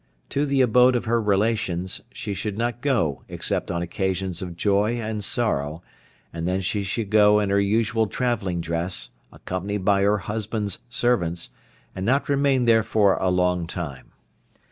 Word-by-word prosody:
To 145 +1 0
the 135 -1 +2
abode 125 +1 +5
of 120 - -1
her 115 +1 +1
relations 100 -3 0
she 105 -2 -5
should 100 +1 -4
not 120 +1 -2
go 110 - 0
except - - -2
on 85 0 -1
occasions 95 0 -2
of 90 -2 -6
joy 105 +4 +2
and 110 -3 -3
sorrow, 80 - 0 0.5
and 85 0 -3
then 95 +1 0
she 100 +3 -1
should 100 +2 -3
go 105 -1 +6
in 100 -2 0
her 100 - +3
usual 110 +2 +1
travelling 100 -6 -1
dress, 85 -6 -3 0.2
accompanied 95 +2 -4
by 100 -1 +4
her 100 +2 +3
husband's 105 -1 -3
servants, 90 -9 0 0.4
and 95 - -4
not 135 +8 +1
remain 140 -3 +2
there 115 -1 +5
for 105 -2 +3
a 95 - +1
long 90 -1 +1
time. 80 -7 -6
100 Hz, 165 wpm, -24 LUFS, 90-115 Hz, 0.5 s, go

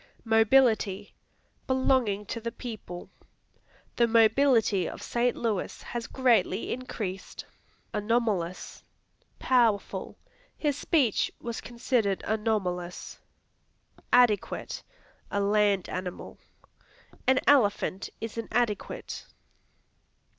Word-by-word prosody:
Mobility 225 -3 +3 0.5
Belonging 260 -6 +2
to 230 - -5
the 230 +1 -3
people; 215 -8 -8 0.9
"The 235 - +4
mobility 225 -4 +4
of - - -9
St. 240 +1 0
Louis 220 -5 -2
has 240 -1 -5
greatly 250 -3 +1
increased." 210 -6 -6 0.5
Anomalous 210 -5 -1 0.6
Powerful; 230 -6 +1 0.4
"His 295 -3 0
speech 265 - +1
was 235 -1 -5
considered 235 -5 -1
anomalous." 200 -5 -2 0.9
Adequate 240 -5 +2 0.5
A 200 - -1
land 200 -1 +2
animal; 185 -1 -6 0.9
"An 260 0 +5
elephant 205 -7 +2
is 225 0 -5
an 230 - -5
adequate." 225 -3 -2
225 Hz, 85 wpm, -28 LUFS, 200-245 Hz, 0.9 s, An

